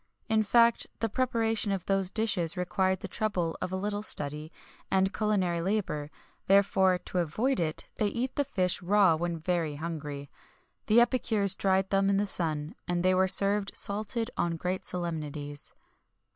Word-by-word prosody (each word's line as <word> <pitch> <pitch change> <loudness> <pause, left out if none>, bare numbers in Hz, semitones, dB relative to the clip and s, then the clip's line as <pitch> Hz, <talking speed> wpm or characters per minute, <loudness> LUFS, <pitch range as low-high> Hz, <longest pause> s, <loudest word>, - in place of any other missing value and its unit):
[XXI - - -44
4] - - 0
In 220 - +4
fact, 235 +2 +3
the 225 - -1
preparation 225 -3 0
of 190 -3 -3
those 195 -2 +1
dishes 195 -6 +3
required 185 +1 -1
the - - -5
trouble 180 -7 -2
of 185 - -3
a - - -2
little 205 +2 -3
study 150 -5 +4 0.4
and 190 +1 +1
culinary 190 -5 0
labour; 180 -6 -2 0.4
therefore, 195 -1 +3
to 180 0 -5
avoid 220 - -1
it, 155 -2 -2
they 210 - +1
eat 245 +5 -3
the 285 - +1
fish 185 -10 -2
raw 190 -2 +3
when 170 +1 -3
very 165 -2 -2
hungry; 145 -3 -6 0.6
the 220 +2 +5
epicures 220 -5 +1
dried 190 0 0
them 195 0 +2
in 200 - +2
the 205 - +1
sun, 155 -5 -1
and 175 -1 -1
they 185 0 +3
were 190 +1 +2
served 200 +1 +4
salted 220 +4 -2
on 170 -1 -1
great 180 +3 -3
solemnities. 150 -4 -6
190 Hz, 170 wpm, -28 LUFS, 170-210 Hz, 0.6 s, the